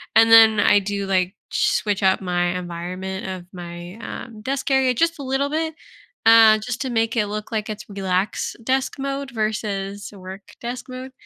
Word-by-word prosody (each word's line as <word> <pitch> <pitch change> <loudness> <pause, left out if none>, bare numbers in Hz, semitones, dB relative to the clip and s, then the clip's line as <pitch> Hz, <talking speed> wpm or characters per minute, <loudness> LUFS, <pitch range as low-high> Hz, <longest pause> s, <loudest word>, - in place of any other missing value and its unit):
And, 225 0 +6
then, 220 -1 +8
I 205 0 +5
do, 200 0 -3
like, 190 0 0
sh - - +1
switch 205 -2 -1
up 190 0 +4
my 175 -1 0
environment 180 +2 -5
of 185 -2 -6
my, 175 0 -8
um, 220 -1 -8
desk 270 +5 -2
area 265 -1 +3
just 330 +4 +1
a - - -5
little 270 +2 0
bit, 320 +1 -2 0.5
uh, 225 -1 +8
just 235 +2 -5
to 265 - -2
make 225 -1 0
it 210 -2 +2
look 210 +1 -5
like 215 -1 -2
it's 215 0 -6
relax 195 0 -2
desk 260 +3 0
mode 275 0 -3
versus 210 -3 -3
work 195 +2 -10
desk 245 +1 -5
mode. 255 +1 -7
215 Hz, 180 wpm, -22 LUFS, 190-255 Hz, 0.5 s, then